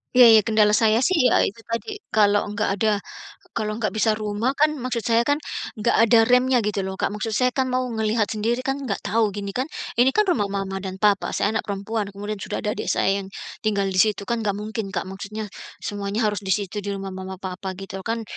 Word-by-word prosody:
Ya 250 Hz, -, +9 dB
ya 220 Hz, -, +8 dB
kendala 215 Hz, 0 st, +3 dB
saya 220 Hz, +2 st, +3 dB
sih 320 Hz, -7 st, +4 dB
ya -, -, +4 dB
itu 205 Hz, -, -3 dB
tadi 320 Hz, -, -4 dB, 0.2 s
kalau 205 Hz, -1 st, +4 dB
nggak 215 Hz, -, 0 dB
ada, 215 Hz, -1 st, +3 dB, 0.6 s
kalau 215 Hz, -1 st, -2 dB
nggak 215 Hz, -1 st, -1 dB
bisa 220 Hz, 0 st, +2 dB
rumah 215 Hz, +5 st, -1 dB
kan 305 Hz, +2 st, +3 dB
maksud 245 Hz, -2 st, -2 dB
saya 230 Hz, +1 st, +3 dB
kan 290 Hz, -, +4 dB, 0.4 s
enggak 220 Hz, +1 st, +1 dB
ada 230 Hz, 0 st, +6 dB
remnya 250 Hz, +2 st, +4 dB
gitu 210 Hz, -1 st, -1 dB
loh 190 Hz, 0 st, -4 dB
Kak, -, -, -1 dB
maksud 215 Hz, +2 st, -3 dB
saya 250 Hz, +2 st, +3 dB
kan 260 Hz, 0 st, 0 dB
mau 255 Hz, 0 st, 0 dB
ngelihat 220 Hz, -1 st, +1 dB
sendiri 230 Hz, +3 st, 0 dB
kan 270 Hz, +1 st, -1 dB
enggak 255 Hz, -8 st, -3 dB
tahu 210 Hz, +1 st, +1 dB
gini 200 Hz, -1 st, -4 dB
kan, 255 Hz, +7 st, -2 dB, 0.3 s
ini 255 Hz, +2 st, +6 dB
kan 425 Hz, -, +5 dB
rumah 210 Hz, -, +2 dB
mama 195 Hz, -1 st, -3 dB
dan 190 Hz, -1 st, -5 dB
papa 205 Hz, -2 st, +3 dB
saya 205 Hz, -, +1 dB
anak -, -, -2 dB
perempuan 205 Hz, +1 st, -2 dB
kemudian 205 Hz, +1 st, -5 dB
sudah -, -, -4 dB
ada 210 Hz, -, 0 dB
adik -, -, -5 dB
saya 195 Hz, +1 st, +1 dB
yang, -, -, -10 dB, 0.4 s
tinggal 205 Hz, -2 st, +1 dB
di 185 Hz, -1 st, -1 dB
situ 210 Hz, 0 st, +3 dB
kan 235 Hz, +3 st, -1 dB
enggak 200 Hz, -1 st, +1 dB
mungkin 215 Hz, 0 st, -4 dB
Kak, -, -, 0 dB
maksudnya 200 Hz, +3 st, -6 dB, 0.4 s
semuanya 205 Hz, +2 st, -2 dB
harus 205 Hz, -1 st, -1 dB
di 190 Hz, -, -2 dB
situ 205 Hz, 0 st, -4 dB
di 205 Hz, -, -7 dB
rumah 195 Hz, 0 st, -5 dB
mama 190 Hz, 0 st, -6 dB
papa 190 Hz, 0 st, -5 dB
gitu 195 Hz, 0 st, -7 dB
kan, 230 Hz, 0 st, -2 dB
215 Hz, 225 wpm, -23 LUFS, 200-230 Hz, 0.6 s, Ya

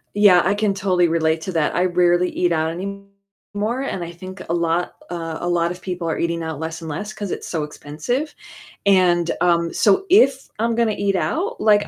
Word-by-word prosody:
Yeah, 200 Hz, -4 st, +6 dB
I 195 Hz, +3 st, +1 dB
can 205 Hz, -1 st, +1 dB
totally 185 Hz, -3 st, +2 dB
relate 160 Hz, -1 st, +1 dB
to 190 Hz, -, -4 dB
that. 160 Hz, -2 st, 0 dB
I 180 Hz, -, +2 dB
rarely 175 Hz, 0 st, +3 dB
eat 175 Hz, -1 st, 0 dB
out 160 Hz, 0 st, +1 dB
anymore, 200 Hz, +4 st, -6 dB
and 190 Hz, -10 st, -3 dB
I 170 Hz, -, -6 dB
think 185 Hz, +2 st, -10 dB
a 170 Hz, -, +1 dB
lot 170 Hz, +1 st, 0 dB, 0.2 s
uh, 165 Hz, -2 st, -4 dB
a 175 Hz, -, -2 dB
lot 170 Hz, 0 st, +1 dB
of 180 Hz, -, -8 dB
people 180 Hz, -2 st, -4 dB
are 160 Hz, -, -1 dB
eating 170 Hz, 0 st, -1 dB
out 160 Hz, -3 st, -5 dB
less 160 Hz, +1 st, -5 dB
and 160 Hz, -, -6 dB
less 205 Hz, +8 st, -4 dB
'cause 205 Hz, -3 st, -5 dB
it's -, -, -5 dB
so 160 Hz, -3 st, -2 dB
expensive, 155 Hz, -, -4 dB, 0.5 s
and, 175 Hz, -3 st, +4 dB
um, 170 Hz, -1 st, +2 dB
so 210 Hz, -, +3 dB
if 275 Hz, -8 st, +5 dB
I'm 230 Hz, +1 st, +1 dB
gonna 230 Hz, -2 st, +2 dB
eat 200 Hz, -1 st, 0 dB
out, 370 Hz, -, -1 dB
like 210 Hz, -1 st, +4 dB
180 Hz, 205 wpm, -21 LUFS, 170-205 Hz, 0.5 s, Yeah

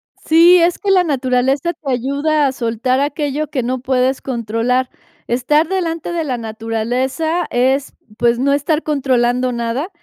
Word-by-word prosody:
Sí, 335 Hz, +3 st, +5 dB
es 345 Hz, +1 st, +2 dB
que 405 Hz, -1 st, 0 dB
la 370 Hz, -2 st, +4 dB
naturaleza 270 Hz, +2 st, 0 dB
te 295 Hz, -4 st, -5 dB
ayuda 280 Hz, +4 st, +1 dB
a -, -, 0 dB
soltar 245 Hz, +1 st, -1 dB
aquello 290 Hz, +1 st, -2 dB
que 255 Hz, -, -2 dB
no 255 Hz, +2 st, -2 dB
puedes 255 Hz, +1 st, 0 dB
controlar. 240 Hz, +1 st, -1 dB, 0.4 s
Estar 295 Hz, +6 st, +1 dB
delante 340 Hz, -3 st, -2 dB
de 335 Hz, -2 st, -1 dB
la 255 Hz, -4 st, -2 dB
naturaleza 235 Hz, +9 st, -2 dB
es, 265 Hz, +3 st, 0 dB, 0.2 s
pues, 235 Hz, 0 st, +2 dB
no 280 Hz, +2 st, +2 dB
estar 300 Hz, +3 st, 0 dB
controlando 255 Hz, -4 st, +1 dB
nada, 235 Hz, +7 st, -3 dB
265 Hz, 150 wpm, -17 LUFS, 245-310 Hz, 0.4 s, Sí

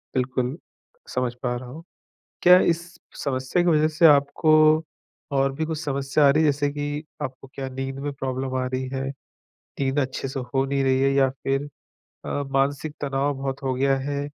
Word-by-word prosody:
बिल्कुल, 130 Hz, +2 st, -1 dB, 0.5 s
समझ 125 Hz, -1 st, -1 dB
पा 125 Hz, -1 st, 0 dB
रहा 120 Hz, 0 st, -7 dB
हूँ। 155 Hz, +6 st, -10 dB, 0.6 s
क्या 180 Hz, +1 st, +8 dB
इस 170 Hz, -, -7 dB, 0.4 s
समस्या 130 Hz, +4 st, 0 dB
की 175 Hz, -, +3 dB
वज़ह 155 Hz, -1 st, +4 dB
से 165 Hz, -, +5 dB
आपको 145 Hz, +1 st, +4 dB, 0.8 s
और 135 Hz, 0 st, +2 dB
भी 160 Hz, +3 st, -2 dB
कुछ 160 Hz, -1 st, -3 dB
समस्या 140 Hz, 0 st, +1 dB
आ -, -, +6 dB
रही 155 Hz, +3 st, +4 dB
है 150 Hz, -, +5 dB
जैसे 145 Hz, 0 st, -1 dB
कि 145 Hz, +1 st, -4 dB, 0.2 s
आपको 130 Hz, 0 st, -6 dB
क्या 135 Hz, -1 st, -4 dB
नींद 135 Hz, +1 st, -5 dB
में 145 Hz, -, -1 dB
प्रॉब्लम 130 Hz, -1 st, -3 dB
आ -, -, -1 dB
रही 130 Hz, 0 st, -3 dB
है? 135 Hz, -, -2 dB, 0.8 s
नींद 135 Hz, +1 st, +1 dB
अच्छे 130 Hz, 0 st, -2 dB
से 135 Hz, +1 st, -4 dB
हो 135 Hz, +2 st, -1 dB
नहीं 135 Hz, 0 st, 0 dB
रही 130 Hz, 0 st, +2 dB
है? 135 Hz, 0 st, +3 dB
या 135 Hz, -1 st, +4 dB
फिर 135 Hz, +2 st, -2 dB, 0.6 s
अ, -, -, -6 dB, 0.2 s
मानसिक 140 Hz, +2 st, 0 dB
तनाव 140 Hz, 0 st, 0 dB
बहुत 135 Hz, 0 st, -4 dB
हो 130 Hz, -1 st, -1 dB
गया 135 Hz, +1 st, +2 dB
है? 140 Hz, +1 st, -3 dB
135 Hz, 190 wpm, -24 LUFS, 130-145 Hz, 0.8 s, क्या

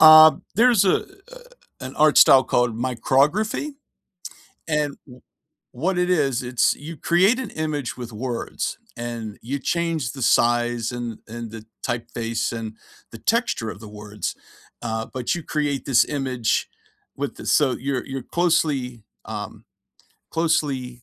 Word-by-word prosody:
Uh, 155 Hz, 0 st, +10 dB, 0.2 s
there's 230 Hz, -2 st, +5 dB
a 185 Hz, -, +4 dB, 0.4 s
a -, -, -10 dB, 0.4 s
an 130 Hz, +1 st, -7 dB
art 155 Hz, 0 st, +4 dB
style 130 Hz, -1 st, +8 dB
called 120 Hz, -2 st, +1 dB
micrography, 140 Hz, -, +1 dB, 1.0 s
and 150 Hz, -2 st, 0 dB
wha 125 Hz, -1 st, -13 dB, 0.5 s
what 180 Hz, +8 st, -1 dB
it 180 Hz, 0 st, +1 dB
is, 140 Hz, -8 st, +1 dB
it's 125 Hz, -1 st, +2 dB
you 155 Hz, +2 st, -9 dB
create 190 Hz, -, +3 dB
an 260 Hz, -, -4 dB
image 150 Hz, -5 st, -3 dB
with 120 Hz, -1 st, -7 dB
words, 120 Hz, +2 st, -4 dB, 0.2 s
and 115 Hz, -3 st, -5 dB
you 135 Hz, +5 st, -3 dB
change 165 Hz, -4 st, -1 dB
the 135 Hz, -, -8 dB
size 120 Hz, -1 st, +2 dB
and 120 Hz, -2 st, -5 dB
and 115 Hz, 0 st, -7 dB
the 110 Hz, -1 st, -9 dB, 0.2 s
typeface 115 Hz, -1 st, -2 dB
and 110 Hz, -1 st, -6 dB, 0.4 s
the 115 Hz, -, -9 dB
texture 230 Hz, -, 0 dB
of 100 Hz, -, -8 dB
the 110 Hz, -, -10 dB
words, 105 Hz, -1 st, -5 dB, 0.5 s
uh, 110 Hz, -1 st, -2 dB
but 130 Hz, +5 st, -1 dB
you 170 Hz, -, -5 dB
create 145 Hz, -4 st, -1 dB
this 130 Hz, -4 st, +4 dB
image 130 Hz, -6 st, -1 dB, 0.5 s
with -, -, -3 dB
the -, -, -9 dB
so 145 Hz, -3 st, +3 dB
your 135 Hz, 0 st, -2 dB
your 135 Hz, 0 st, -5 dB
closely, 150 Hz, -9 st, 0 dB, 0.2 s
um, -, -, -7 dB, 0.7 s
closely 135 Hz, -7 st, 0 dB
130 Hz, 145 wpm, -23 LUFS, 120-155 Hz, 1.0 s, Uh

